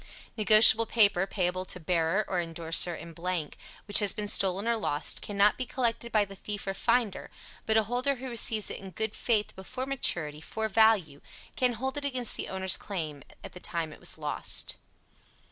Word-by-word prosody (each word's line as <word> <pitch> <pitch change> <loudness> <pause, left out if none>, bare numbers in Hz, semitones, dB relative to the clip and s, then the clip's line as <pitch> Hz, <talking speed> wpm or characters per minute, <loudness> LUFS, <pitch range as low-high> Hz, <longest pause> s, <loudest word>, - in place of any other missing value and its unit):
Negotiable 220 +1 +7
paper, 200 -5 +3
payable 185 -1 -2
to 180 - -1
bearer 170 +4 0
or 185 - -2
indorser 165 +1 +2
in 170 0 -11
blank, 170 -3 -4 0.3
which 205 - +4
has 205 -1 +2
been 210 -2 -4
stolen 195 +1 0
or 235 - +2
lost, 150 -9 -1
cannot 205 +2 +1
be 255 - -2
collected 235 -2 -2
by 210 -2 +2
the 195 0 -12
thief 205 +2 -6
or 195 - -3
finder, 220 0 -1 0.4
but 220 0 +2
a 220 - +3
holder 250 +5 -1
who 260 +1 -8
receives 225 -3 +2
it - - -6
in 195 - -10
good 220 +4 -4
faith 215 -4 -1
before 255 +7 -6
maturity, 160 - -2
for 220 +6 -4
value, 210 -9 +2 0.3
can 250 -1 +1
hold 265 +5 -4
it 290 - -3
against 255 -4 +1
the - - -5
owner's 190 -1 +1
claims 155 -8 -6 0.2
at - - -9
the 180 - -10
time 165 -3 -2
it - - -15
was - - -2
lost. - - -2
205 Hz, 190 wpm, -28 LUFS, 180-230 Hz, 0.4 s, Negotiable